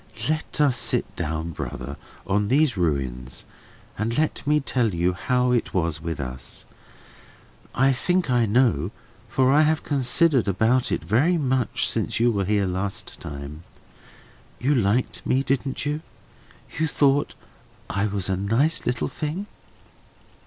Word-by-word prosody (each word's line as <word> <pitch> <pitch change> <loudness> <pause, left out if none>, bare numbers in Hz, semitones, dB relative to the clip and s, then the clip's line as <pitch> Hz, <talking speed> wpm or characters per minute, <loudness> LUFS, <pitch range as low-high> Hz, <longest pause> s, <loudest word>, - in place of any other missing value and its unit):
Let 155 0 -2
us 140 -4 +3
sit - - 0
down, 80 +2 -3
brother, 70 -3 -6 0.3
on 105 +1 +1
these 140 +1 +3
ruins, 65 -8 -2 0.5
and 115 +2 -1
let 155 0 0
me 150 0 +4
tell 120 -8 0
you 90 +2 +1
how 125 +7 +1
it 120 -5 0
was 80 -3 0
with 80 -3 -4
us. 65 -1 -6 1.1
I 135 +1 +4
think 180 +7 0
I 120 -2 +3
know, 105 - +2 0.4
for 130 +2 +3
I 150 - +6
have 155 0 +2
considered 135 -1 +3
about 110 +6 +2
it - - -1
very 150 - +2
much 130 -6 +1
since - - 0
you 120 +1 +4
were 100 -3 -1
here 100 0 +1
last 95 +2 -3
time. 70 +2 -7 1.0
You 135 +4 +2
liked 120 0 +1
me, 130 +1 +1
didn't 135 0 -1
you? 150 +2 -1 0.8
You 160 - +2
thought 145 -1 +2 0.5
I 100 +2 0
was 100 -2 -1
a 95 - +1
nice 115 - +1
little 125 0 0
thing?" 160 +7 -4
120 Hz, 145 wpm, -24 LUFS, 95-140 Hz, 1.1 s, I